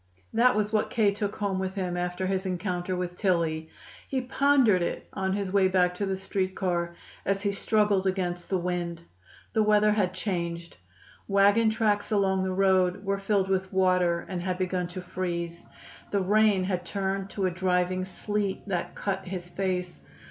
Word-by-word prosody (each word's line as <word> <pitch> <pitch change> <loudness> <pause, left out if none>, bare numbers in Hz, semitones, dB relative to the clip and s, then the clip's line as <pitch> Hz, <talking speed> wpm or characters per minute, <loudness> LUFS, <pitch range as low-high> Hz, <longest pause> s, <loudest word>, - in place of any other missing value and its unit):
That 245 +1 +4
was 210 0 0
what 215 - +2
K. 215 -3 +3
took 205 0 -3
home 200 -2 -1
with 190 0 -3
him 180 -3 -2
after 180 +1 -2
his 190 0 -1
encounter 180 0 -2
with 180 -1 -3
Tillie. 165 -5 0 0.4
He 265 - -1
pondered 255 -6 +3
it 170 - -3
on 190 -1 -1
his 200 -2 -2
way 195 -2 +5
back 180 -1 +2
to 200 +2 -3
the 190 0 -1
street 190 0 -2
car, 170 -2 -1 0.3
as 195 +1 0
he 200 - +1
struggled 200 -1 +2
against 180 -2 -2
the 190 - +1
wind. 175 -1 -3 0.5
The 220 - +3
weather 210 0 +4
had 190 -3 +1
changed. 170 -3 -3 0.5
Wagon 200 +3 +4
tracks 215 -2 0
along 195 -2 +2
the 190 0 -1
road 190 0 +2
were 195 0 0
filled 195 -1 +1
with 190 0 -1
water 180 -2 +2
and 180 -2 -4
had 180 0 -2
begun 185 -1 -1
to 180 +1 -7
freeze. 170 -2 -4 0.5
The 200 - +1
rain 205 0 +3
had 185 -1 -1
turned 195 +1 -2
to 195 -1 -2
a 185 - +1
driving 185 0 0
sleet 205 +1 -3
that 180 -4 -2
cut 195 -1 -3
his 180 -1 -5
face. 180 -2 -2
190 Hz, 175 wpm, -27 LUFS, 180-200 Hz, 0.5 s, way